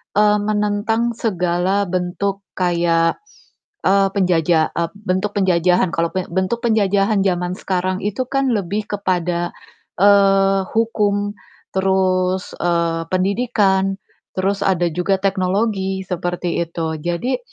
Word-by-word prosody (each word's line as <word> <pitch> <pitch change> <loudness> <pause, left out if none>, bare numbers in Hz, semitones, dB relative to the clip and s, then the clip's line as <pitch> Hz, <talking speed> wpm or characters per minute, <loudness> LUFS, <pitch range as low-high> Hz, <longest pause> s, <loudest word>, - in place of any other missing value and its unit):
eee, 210 0 +4
menentang 210 +2 0
segala 185 -1 0
bentuk 185 +2 -2 0.2
kayak, 170 -2 +1 0.6
eee, 195 0 +4
penjaja 170 -4 +2
eee, 170 -1 0
bentuk 200 0 -2
penjajahan 180 -1 +3
kalau 165 0 +1
bentuk 190 +4 -1
penjajahan 200 -2 +2
zaman 180 -1 0
sekarang 185 0 -1
itu 210 +5 -1
kan 275 -1 +1
lebih 205 +1 -2
kepada, 180 -3 -1 0.5
eee, 195 -1 +5
hukum, 205 -2 0 0.4
terus, 185 -1 +1
eee, 170 -1 0
pendidikan, 195 -1 +1 0.4
terus 195 +1 0
ada 180 -2 +2
juga 180 +4 0
teknologi, 195 0 0
seperti 175 -1 -2
itu. 165 -1 -4
Jadi 175 - -2
190 Hz, 105 wpm, -19 LUFS, 175-205 Hz, 0.6 s, eee